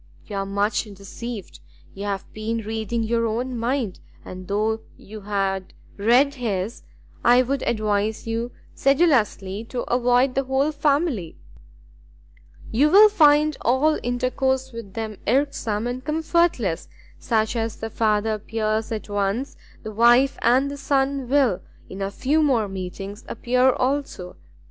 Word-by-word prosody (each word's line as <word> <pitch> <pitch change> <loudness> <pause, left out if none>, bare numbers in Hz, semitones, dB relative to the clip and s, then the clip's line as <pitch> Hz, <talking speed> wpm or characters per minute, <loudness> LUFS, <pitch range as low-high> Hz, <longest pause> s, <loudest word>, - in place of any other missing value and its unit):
"You 205 - -6
are 195 0 -2
much 205 +3 0
deceived; 205 +2 -8 0.3
you 200 +1 -6
have 195 -1 -3
been 220 +2 -3
reading 220 +1 -2
your 230 +1 0
own 245 +3 -2
mind, 235 -3 -2 0.3
and 185 0 -9
thought 220 +2 0
you 215 +1 -11
had 195 -2 -2 0.2
read 245 +7 +3
his: 225 -4 -3 0.4
I 245 +1 +6
would 270 +1 -2
advise 215 -1 0
you 230 +2 -3 0.2
sedulously 245 - +2
to 245 +1 -4
avoid 245 +1 +2
the 270 +1 0
whole 265 +3 +1
family; 285 - 0 1.3
you 280 +7 +3
will 415 +5 +8
find 305 -5 +4
all 270 +6 +2
intercourse 260 +2 -1
with 230 -5 -9
them 220 -2 -5
irksome 240 -4 0
and 245 +1 -4
comfortless: 305 - 0 0.3
such 220 0 0
as 225 -1 -2
the 225 0 -6
father 220 0 +1
appears 215 +1 -2
at 220 -1 -4
once, 205 +6 -2 0.3
the 215 - -6
wife 240 +5 +4
and 265 +3 +3
the 285 - -6
son 275 -2 0
will, 265 -9 +2 0.3
in 195 - -7
a 195 - -1
few 280 +9 +1
more 250 -8 +2
meetings, 195 +2 -7
appear 250 +3 +2
also. 255 -9 -2
230 Hz, 140 wpm, -23 LUFS, 210-265 Hz, 1.3 s, will